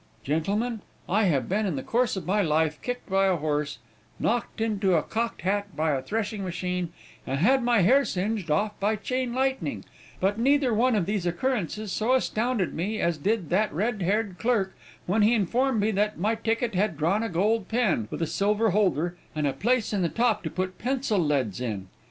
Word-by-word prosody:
"Gentlemen, 200 - -1 0.3
I 210 +3 +2
have 145 -8 +1
been, 205 +3 0
in 175 - -1
the 130 - -4
course 240 -1 +1
of 190 - -5
my 205 +3 +2
life, 155 -3 +1
kicked 245 0 -4
by 195 0 +3
a 190 - +3
horse, 150 -3 -1 0.4
knocked 235 0 -1
into 205 -4 +1
a 155 - +2
cocked 230 +1 -3
hat 200 -1 -1
by 155 +1 +1
a 135 -2 0
threshing 215 - -3
machine, 180 -1 -3 0.4
and 135 - -1
had 260 - +4
my 240 -3 +3
hair 260 +10 +5
singed 195 -3 -2
off 205 +7 0
by 210 +2 +1
chain 250 +4 -2
lightning, 265 +1 -1 0.3
but 200 +3 +1
neither 270 0 +3
one 240 +2 +3
of 195 -5 +1
these 200 -2 -1
occurrences 210 +1 -2
so 225 +6 +1
astounded 235 -5 0
me 210 +6 -2
as 170 -2 0
did 200 0 -1
that 210 +4 +2
red 210 +5 -1
haired 200 +1 0
clerk, 220 -5 +1 0.3
when 205 +5 +1
he 220 +3 +5
informed 235 +4 +1
me 210 +2 +2
that 210 +1 0
my 210 +7 +1
ticket 225 0 -1
had 190 -3 0
drawn 170 +8 +1
a 230 - -2
gold 200 +3 +1
pen, 220 - +1
with - - -3
a - - +2
silver 205 +6 +1
holder, 175 -4 +1 0.2
and 150 -1 0
a 140 - +1
place 230 - 0
in 200 - +1
the 170 - +1
top 230 0 +1
to - - -4
put 185 0 -4
pencil 250 -4 0
leads 135 - 0
in. 105 -6 -3
205 Hz, 200 wpm, -26 LUFS, 175-225 Hz, 0.4 s, hair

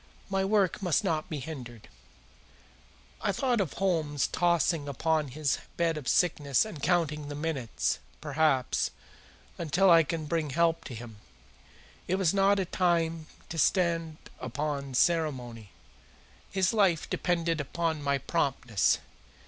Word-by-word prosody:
My 195 0 +1
work 200 -1 +2
must 180 +2 +1
not 160 -5 -1
be 155 - -3
hindered." 125 -6 -8 1.3
I - - +1
thought 245 +2 +1
of 170 -8 -2
Holmes 160 -7 0
tossing 170 -3 +1
upon 155 +2 0
his 140 +1 -1 0.2
bed 170 -1 +1
of 150 -4 -6
sickness 145 - +2
and 205 -10 -8
counting 155 -4 0
the 145 - -5
minutes, 145 -6 -2 0.2
perhaps, 150 -4 +1 0.7
until 175 +4 +3
I 165 -1 +8
could 160 0 -3
bring 160 -1 -1
help 165 +3 +1
to 125 - -7
him. 115 -1 -9 0.9
It 185 - +1
was 190 -3 +2
not 200 0 +4
a 190 - 0
time 165 -3 0 0.2
to 165 - -4
stand 165 -1 +1 0.2
upon 140 +1 -3
ceremony. 125 - 0 0.8
His 190 +1 +1
life 195 -7 +2
depended 170 -3 0
upon 160 +2 -2
my 140 -1 +1
promptness. 130 - +1
160 Hz, 130 wpm, -29 LUFS, 140-175 Hz, 1.3 s, I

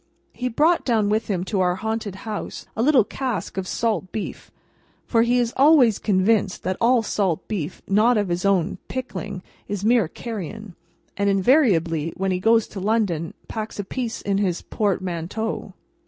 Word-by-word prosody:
He 250 0 -2
brought 315 +8 +3
down 220 -5 +2
with 215 +1 0
him 185 -4 -1
to 195 +1 -2
our 180 -1 +2
haunted 220 0 -3
house 215 -2 -5
a 225 - -1
little 265 -2 +5
cask 240 -4 -4
of 190 -1 -3
salt 210 -5 -1
beef; 215 - -5 0.6
for, 230 - +2
he 240 +2 +3
is 240 -1 +1
always 270 -6 +5
convinced 200 0 +1
that 185 +1 -1
all 235 0 +4
salt 195 -6 -1
beef 180 -6 -4
not 220 +4 +4
of 205 -3 0
his 175 +1 -1
own 190 -4 +1
pickling, 205 -7 -5 0.2
is 205 0 -3
mere 230 -5 +4
carrion, 215 0 -7 0.4
and 200 0 +2
invariably, 185 - +3
when 195 0 0
he 180 - 0
goes 225 +3 +4
to 200 - -7
London, 190 -6 0
packs 220 -1 -5
a 205 - -2
piece 235 +3 -4
in 200 -1 0
his 185 -4 -1
portmanteau. 190 +1 -2
210 Hz, 170 wpm, -23 LUFS, 185-230 Hz, 0.6 s, little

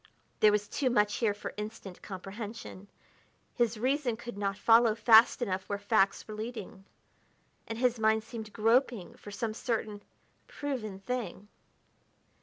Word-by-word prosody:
There 215 - +6
was 205 0 0
too 270 -3 0
much 210 -4 +2
here 215 -4 +1
for 205 - -7
instant 210 -3 -7
comprehension; 200 +1 -8 0.7
his 235 -2 +1
reason 255 0 0
could 235 -1 -8
not 200 -1 -2
follow 225 0 +5
fast 230 +2 +6
enough 190 -3 -3
where 200 - -1
facts 205 -1 +1
were 215 - -7
leading, 215 -3 -7 0.8
and 225 - -5
his 245 -1 +1
mind 220 0 +3
seemed 220 -2 -8
groping 225 -2 +1
for - - -12
some 215 +2 -3
certain, 215 -3 -3 0.5
proven 230 -9 -5
thing. 235 -3 -4
220 Hz, 140 wpm, -30 LUFS, 205-235 Hz, 0.8 s, There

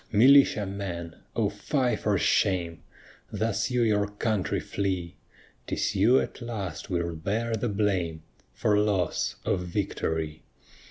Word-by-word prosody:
Militia 120 -1 +6
men! 90 -4 -5 0.2
O - - +2
fie 130 -4 0
for 105 -2 0
shame! 90 -4 +1 0.5
Thus 110 +1 -1
you 125 -1 +2
your 105 -2 +2
country 105 -1 -1
flee. 95 -4 -3 0.5
'Tis - - -1
you 110 +7 +5
at - - -5
last 105 -8 -5
will 85 -2 -1
bear 110 +8 -2
the 115 +2 -1
blame 95 -6 -1 0.3
For 105 0 +2
loss 100 -5 0
of - - +1
victory. 80 -4 -2
100 Hz, 125 wpm, -27 LUFS, 85-110 Hz, 0.5 s, Militia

